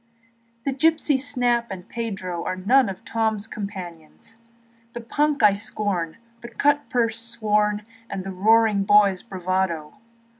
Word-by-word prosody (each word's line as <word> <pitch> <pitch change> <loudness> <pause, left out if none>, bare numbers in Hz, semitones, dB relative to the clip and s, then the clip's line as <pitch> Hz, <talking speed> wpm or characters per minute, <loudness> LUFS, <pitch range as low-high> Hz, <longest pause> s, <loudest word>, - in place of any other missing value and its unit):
The 275 - 0
gypsies, 305 -1 +2
Snap 245 -4 0
and 185 -2 -8
Pedro, 190 -7 -4
Are 185 - -2
none 230 +6 +3
of 195 +4 -8
Tom's 220 -1 -1
comradoes, 190 -1 -8 0.6
The 240 - -6
punk 290 +3 0
I 210 -2 +7
scorn 200 -5 -2
and 235 0 -33
the 235 - -8
cutpurse 240 -4 +1
sworn, 210 -2 0 0.3
And 190 - -4
the 195 - -5
roaring 215 +1 +3
boy's 200 -2 +4
bravadoes. 185 -5 -2
215 Hz, 135 wpm, -23 LUFS, 190-235 Hz, 0.6 s, I